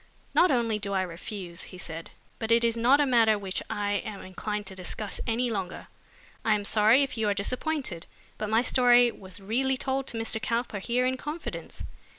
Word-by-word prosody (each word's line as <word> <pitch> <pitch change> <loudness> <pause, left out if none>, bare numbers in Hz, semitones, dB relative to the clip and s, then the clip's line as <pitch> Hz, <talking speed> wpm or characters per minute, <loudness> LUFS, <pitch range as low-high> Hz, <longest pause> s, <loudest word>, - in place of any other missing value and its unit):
"Not 360 - +5
only 230 -5 +1
do 200 -1 -3
I 190 -1 +2
refuse," 175 0 -7
he 185 - -10
said, 165 -2 -6 0.3
"but 225 0 -2
it 230 0 +5
is 230 -1 +2
not 245 +5 +4
a 290 - +4
matter 230 -4 +4
which 195 -2 -3
I 205 0 0
am 200 -2 -7
inclined 210 +3 -4
to 195 -1 -8
discuss 190 +3 -5
any 235 +1 +1
longer. 190 -4 -4 0.5
I 220 - +4
am 205 -1 -3
sorry 220 +6 +5
if 265 -4 -4
you 215 -1 +2
are 200 - +1
disappointed, 250 - -2 0.3
but 215 - -2
my 225 +2 +3
story 245 -1 +5
was 190 -3 -10
really 255 +7 0
told 270 +1 -1
to 230 - -1
Mr. 225 0 -1
Cowper 230 -2 -1
here 245 +5 0
in 260 0 0
confidence." 300 +5 -6
220 Hz, 195 wpm, -28 LUFS, 200-245 Hz, 0.5 s, Not